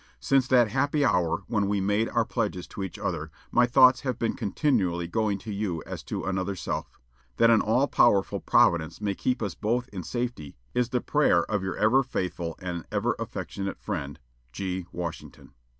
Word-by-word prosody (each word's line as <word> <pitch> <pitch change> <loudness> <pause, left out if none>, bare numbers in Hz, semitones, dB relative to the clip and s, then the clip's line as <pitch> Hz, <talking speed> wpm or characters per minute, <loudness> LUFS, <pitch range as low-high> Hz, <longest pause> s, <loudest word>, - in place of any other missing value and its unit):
Since 130 - +2
that 120 -4 +4
happy 145 +3 +1
hour 90 -4 +1
when 105 -1 0
we 100 0 0
made 105 +3 +1
our 115 -1 +1
pledges 110 -7 -2
to - - -7
each 95 -3 -5
other, 80 -3 -3 0.2
my 120 0 +4
thoughts 130 +1 +6
have 130 -4 -2
been 115 -3 0
continually 95 - 0
going 105 +2 0
to 105 +1 -7
you 100 -6 -2
as - - -6
to - - -4
another 95 +1 -1
self. - - -5 0.4
That 115 0 +5
an 115 - +5
all 125 +6 +2
powerful 100 -8 +3
Providence 80 -2 +2
may 105 -1 -1
keep 125 +4 -1
us 100 -4 -2
both 120 +3 -1
in 95 -3 -6
safety 120 - -4 0.2
is 125 -1 +1
the 125 0 0
prayer 145 - +3
of 105 -3 -2
your 95 -1 -3
ever 115 +5 +4
faithful 90 -9 -3
and 90 -3 -4
"Ever - - 0
affectionate 100 0 -5
friend, 75 -9 -5 0.3
"G. 90 +5 -4
WASHINGTON." 85 -2 -7
105 Hz, 180 wpm, -27 LUFS, 90-120 Hz, 0.4 s, thoughts